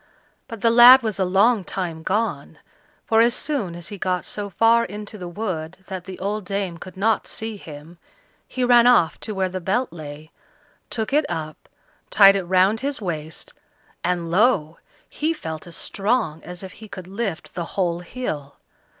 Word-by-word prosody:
But 230 Hz, -3 st, -8 dB
the 230 Hz, -, +4 dB
lad 245 Hz, +2 st, +9 dB
was 215 Hz, -3 st, -2 dB
a 190 Hz, -, +2 dB
long 200 Hz, +4 st, +3 dB
time 175 Hz, -4 st, -4 dB
gone, 215 Hz, +7 st, -2 dB, 0.5 s
for 225 Hz, 0 st, +4 dB
as 235 Hz, +1 st, +4 dB
soon 235 Hz, -, -2 dB
as 170 Hz, 0 st, -7 dB
he 205 Hz, -, -8 dB
got 180 Hz, -1 st, -1 dB
so 205 Hz, -1 st, -4 dB
far 230 Hz, +5 st, +4 dB
into 210 Hz, +1 st, -7 dB
the 180 Hz, -4 st, -7 dB
wood 175 Hz, -3 st, -4 dB
that 185 Hz, -2 st, -7 dB
the 190 Hz, -1 st, -8 dB
old 205 Hz, +2 st, -3 dB
dame 190 Hz, -2 st, -3 dB
could 185 Hz, +2 st, -10 dB
not 220 Hz, +3 st, +1 dB
see 220 Hz, 0 st, -4 dB
him, 160 Hz, -2 st, -12 dB, 0.5 s
he 255 Hz, -, -3 dB
ran 245 Hz, -1 st, +6 dB
off 205 Hz, -10 st, +4 dB
to 215 Hz, -, -6 dB
where 190 Hz, -1 st, +1 dB
the 185 Hz, 0 st, -5 dB
Belt 215 Hz, +7 st, -1 dB
lay, 155 Hz, -1 st, -9 dB, 0.6 s
took 220 Hz, +3 st, -3 dB
it 300 Hz, 0 st, +3 dB
up, 155 Hz, -1 st, -6 dB, 0.4 s
tied 195 Hz, -1 st, +7 dB
it 195 Hz, -2 st, -1 dB
round 190 Hz, +4 st, +3 dB
his 280 Hz, +2 st, -2 dB
waist, 160 Hz, -5 st, -5 dB, 0.5 s
and 175 Hz, -1 st, -1 dB
lo! 175 Hz, -6 st, +2 dB, 0.3 s
he 315 Hz, +2 st, -1 dB
felt 160 Hz, -, -7 dB
as 170 Hz, -, -6 dB
strong 200 Hz, -6 st, -1 dB
as 180 Hz, +2 st, -8 dB
if 190 Hz, -, -8 dB
he 220 Hz, +3 st, -12 dB
could 195 Hz, -3 st, -9 dB
lift 195 Hz, -2 st, -4 dB
the 170 Hz, -1 st, -4 dB
whole 175 Hz, -3 st, +1 dB
hill. 175 Hz, -, -5 dB
190 Hz, 180 wpm, -22 LUFS, 175-225 Hz, 0.6 s, lad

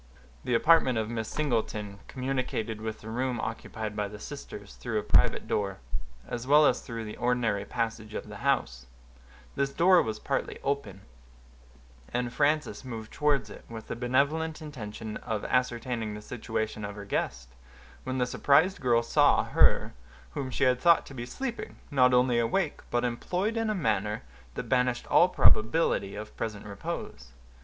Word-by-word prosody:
The 125 Hz, -, +1 dB
apartment 135 Hz, -2 st, +5 dB
of 110 Hz, 0 st, -1 dB
Miss 110 Hz, -2 st, -3 dB
Singleton 110 Hz, -8 st, -2 dB
communicated 130 Hz, -4 st, -2 dB
with 110 Hz, 0 st, -5 dB
the 110 Hz, -, -8 dB
room 125 Hz, +1 st, -1 dB
occupied 110 Hz, -1 st, -4 dB
by 105 Hz, -1 st, -1 dB
the 105 Hz, +1 st, -9 dB
sisters, 105 Hz, -, -8 dB
through -, -, -3 dB
a -, -, 0 dB
private -, -, +3 dB
door, 100 Hz, -2 st, -1 dB, 0.5 s
as 120 Hz, +1 st, -5 dB
well 150 Hz, +2 st, +7 dB
as -, -, +3 dB
through 115 Hz, -3 st, -6 dB
the 105 Hz, -, -7 dB
ordinary 120 Hz, -5 st, +1 dB
passage 110 Hz, -2 st, -3 dB
of -, -, -5 dB
the -, -, -8 dB
house; -, -, 0 dB, 0.7 s
this 140 Hz, 0 st, 0 dB
door 175 Hz, +4 st, +5 dB
was 110 Hz, -5 st, -3 dB
partly -, -, -2 dB
open, 115 Hz, -9 st, -2 dB, 1.1 s
and 120 Hz, 0 st, -1 dB
Frances 150 Hz, 0 st, +1 dB
moved 115 Hz, -4 st, -7 dB
towards 150 Hz, -2 st, +1 dB
it, -, -, -11 dB
with 115 Hz, -1 st, -8 dB
the -, -, -2 dB
benevolent 140 Hz, +6 st, +1 dB
intention 110 Hz, -7 st, -6 dB
of 110 Hz, -2 st, -4 dB
ascertaining 120 Hz, -3 st, -1 dB
the 105 Hz, -, -7 dB
situation 110 Hz, -2 st, -3 dB
of 100 Hz, 0 st, -5 dB
her 100 Hz, -1 st, -8 dB
guest, -, -, -2 dB, 0.5 s
when 130 Hz, 0 st, -3 dB
the 125 Hz, -, +2 dB
surprised 150 Hz, +9 st, +3 dB
girl 120 Hz, -2 st, +3 dB
saw -, -, +4 dB
her -, -, +3 dB, 0.4 s
whom 130 Hz, -, -4 dB
she 135 Hz, -, -1 dB
had 125 Hz, -1 st, +4 dB
thought 170 Hz, -1 st, +5 dB
to -, -, -11 dB
be 120 Hz, -2 st, -6 dB
sleeping, 240 Hz, -, -5 dB
not 130 Hz, -3 st, +5 dB
only 125 Hz, -1 st, +4 dB
awake, 145 Hz, +8 st, 0 dB
but 120 Hz, 0 st, +1 dB
employed 180 Hz, -, -1 dB
in 225 Hz, -1 st, 0 dB
a 215 Hz, -, 0 dB
manner 105 Hz, -, 0 dB, 0.3 s
that -, -, -3 dB
banished 125 Hz, -1 st, +1 dB
all 175 Hz, -, +6 dB
probability 110 Hz, -, +3 dB
of 105 Hz, +1 st, -8 dB
present 105 Hz, -2 st, -4 dB
repose. 65 Hz, -11 st, -6 dB
120 Hz, 165 wpm, -29 LUFS, 110-140 Hz, 1.1 s, well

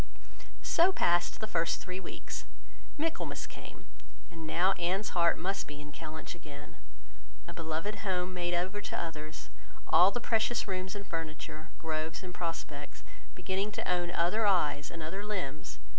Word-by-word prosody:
So 345 Hz, +3 st, +6 dB
passed 175 Hz, -, +3 dB
the -, -, +1 dB
first 170 Hz, -6 st, +2 dB
three 185 Hz, 0 st, -4 dB
weeks. 185 Hz, -, -5 dB, 0.5 s
Michaelmas 320 Hz, +2 st, -1 dB
came; -, -, -10 dB, 0.5 s
and 165 Hz, -2 st, -6 dB
now 180 Hz, +4 st, +4 dB
Anne's 185 Hz, +4 st, +1 dB
heart 170 Hz, -2 st, +4 dB
must 195 Hz, +3 st, -1 dB
be 145 Hz, -1 st, -7 dB
in 150 Hz, 0 st, -8 dB
Kellynch 155 Hz, +2 st, -6 dB
again. 150 Hz, -4 st, -10 dB, 0.7 s
A -, -, -6 dB
beloved 165 Hz, +6 st, -2 dB
home 185 Hz, -2 st, 0 dB
made 175 Hz, -1 st, +1 dB
over 190 Hz, +4 st, 0 dB
to -, -, -2 dB
others; 155 Hz, -2 st, -5 dB, 0.4 s
all 175 Hz, +4 st, +8 dB
the 245 Hz, -, -1 dB
precious 230 Hz, 0 st, +2 dB
rooms 185 Hz, 0 st, -2 dB
and 200 Hz, -1 st, -5 dB
furniture, 155 Hz, -2 st, -4 dB
groves, 160 Hz, +1 st, -2 dB
and 180 Hz, -1 st, -6 dB
prospects, 165 Hz, -4 st, -4 dB, 0.3 s
beginning 190 Hz, +3 st, 0 dB
to -, -, -2 dB
own 175 Hz, -1 st, +2 dB
other 180 Hz, +6 st, +3 dB
eyes 150 Hz, -6 st, +3 dB
and 165 Hz, -2 st, -6 dB
other 190 Hz, +6 st, -3 dB
limbs! 185 Hz, -9 st, -3 dB
175 Hz, 155 wpm, -33 LUFS, 160-195 Hz, 0.7 s, all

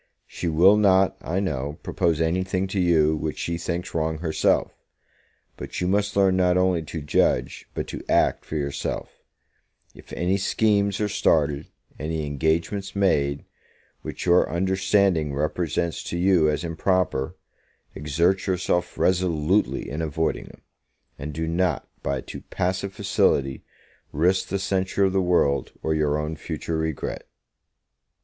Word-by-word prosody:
She 90 Hz, -, -5 dB
will 90 Hz, +6 st, +5 dB
not, 95 Hz, -2 st, +4 dB
I 90 Hz, +4 st, -2 dB
know, 75 Hz, -6 st, -3 dB
propose 85 Hz, -2 st, 0 dB
any 85 Hz, +3 st, +1 dB
thing 95 Hz, 0 st, -1 dB
to 100 Hz, -, -2 dB
you 80 Hz, -3 st, +3 dB
which 75 Hz, -1 st, -3 dB
she 85 Hz, 0 st, -3 dB
thinks 85 Hz, +1 st, -4 dB
wrong 80 Hz, -1 st, -1 dB
herself; 80 Hz, -1 st, +1 dB, 0.8 s
but -, -, -6 dB
you 90 Hz, -, 0 dB
must 100 Hz, +2 st, +1 dB
learn 95 Hz, -2 st, +4 dB
not 90 Hz, -1 st, +3 dB
only 90 Hz, -2 st, +2 dB
to 80 Hz, +1 st, -6 dB
judge 75 Hz, -, 0 dB
but -, -, -2 dB
to -, -, -6 dB
act -, -, +2 dB
for -, -, -7 dB
yourself; 70 Hz, -2 st, -4 dB, 0.7 s
if -, -, -16 dB
any 90 Hz, +3 st, 0 dB
schemes 100 Hz, 0 st, +1 dB
are 105 Hz, -, +1 dB
started, 75 Hz, -7 st, +1 dB, 0.3 s
any 80 Hz, 0 st, -2 dB
engagements 80 Hz, +8 st, -1 dB
made, 70 Hz, -8 st, +1 dB, 0.6 s
which -, -, -6 dB
your 90 Hz, 0 st, +4 dB
understanding 95 Hz, -3 st, +1 dB
represents 80 Hz, +3 st, -1 dB
to 85 Hz, -, -3 dB
you 90 Hz, -3 st, +4 dB
as 75 Hz, +3 st, -1 dB
improper, 85 Hz, -4 st, 0 dB, 0.6 s
exert 85 Hz, +7 st, 0 dB
yourself 90 Hz, -1 st, 0 dB
resolutely 90 Hz, +1 st, +1 dB
in 75 Hz, +3 st, -4 dB
avoiding 80 Hz, +1 st, -1 dB
them; -, -, -15 dB, 0.6 s
and 75 Hz, +2 st, -5 dB
do 80 Hz, +2 st, -3 dB
not, 85 Hz, -2 st, 0 dB
by 70 Hz, 0 st, -1 dB
a -, -, -5 dB
too -, -, -8 dB
passive 95 Hz, +1 st, -1 dB
facility, 70 Hz, -7 st, +1 dB, 0.5 s
risk 90 Hz, +6 st, +1 dB
the 100 Hz, -, 0 dB
censure 95 Hz, 0 st, 0 dB
of 95 Hz, -, 0 dB
the 95 Hz, -, +2 dB
world, 70 Hz, -7 st, +1 dB
or 80 Hz, -, +1 dB
your 75 Hz, -1 st, +1 dB
own 75 Hz, +1 st, -3 dB
future 80 Hz, +1 st, -4 dB
regret. 80 Hz, -2 st, -3 dB
85 Hz, 145 wpm, -24 LUFS, 75-95 Hz, 0.8 s, will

